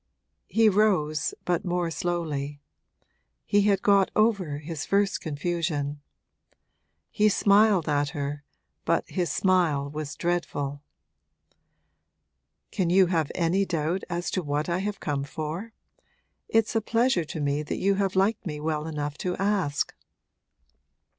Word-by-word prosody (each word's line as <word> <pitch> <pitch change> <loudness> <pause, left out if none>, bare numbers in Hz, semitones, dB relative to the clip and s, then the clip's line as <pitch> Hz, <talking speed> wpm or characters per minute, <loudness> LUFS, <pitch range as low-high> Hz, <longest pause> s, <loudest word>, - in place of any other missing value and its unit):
He 225 0 +4
rose, 185 -8 +2
but 175 -2 0
more 175 -1 -1
slowly; 150 -4 -3 0.9
he 205 - +3
had 195 - +2
got 200 -2 +4
over 200 -9 +2
his 150 0 -5
first 200 0 +1
confusion. 150 -2 -2 1.1
He 215 0 +3
smiled 200 -3 +4
at 145 -1 +1
her, 145 +1 -3 0.4
but - - +1
his 180 -2 -1
smile 165 -7 +2
was 150 -1 -5
dreadful. 145 -5 -2 1.9
'Can 185 -5 0
you 190 +2 +6
have 160 -3 +1
any 180 +3 +2
doubt 170 0 -1
as 175 0 -2
to 185 - 0
what 145 -1 -2
I 170 +1 0
have 205 +1 -3
come 140 -2 -2
for? 155 +9 -5 0.8
It's 225 0 +2
a 225 - +3
pleasure 225 -5 +1
to 155 - -6
me 145 0 0
that 150 - -4
you 200 +1 +2
have 195 -1 0
liked 200 +4 +2
me 150 -6 -5
well 155 0 -2
enough 150 -2 -4
to 180 -1 -2
ask.' 195 -7 0
175 Hz, 135 wpm, -26 LUFS, 150-195 Hz, 1.9 s, you